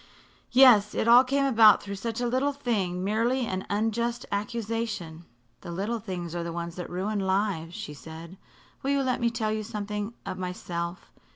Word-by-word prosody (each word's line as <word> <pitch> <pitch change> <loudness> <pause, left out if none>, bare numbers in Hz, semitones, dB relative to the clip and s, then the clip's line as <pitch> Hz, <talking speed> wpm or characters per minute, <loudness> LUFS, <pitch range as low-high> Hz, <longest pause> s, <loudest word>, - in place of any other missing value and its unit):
"Yes. 240 -5 +6
It - - 0
all 240 +2 +8
came 275 +2 +1
about 225 -5 +6
through 200 - -6
such 225 +3 -4
a - - 0
little 260 +4 +1
thing 200 -10 -1
merely 230 +5 +1
an 190 -3 -4
unjust 230 +3 -1
accusation." 210 -6 -3 0.3
"The - - -10
little 205 +7 -2
things 180 -5 -5
are 175 - -2
the 170 - -4
ones 170 0 -5
that 180 - -5
ruin 200 +4 -2
lives," 190 -3 -1
she 215 -9 -6
said. 165 +5 -11 0.4
"Will 270 - -2
you 280 -1 +2
let 255 -1 0
me 235 - +3
tell 225 -2 -2
you 215 0 -1
something 210 0 -4
of - - -5
myself? 175 -1 -5
210 Hz, 180 wpm, -27 LUFS, 180-235 Hz, 0.4 s, all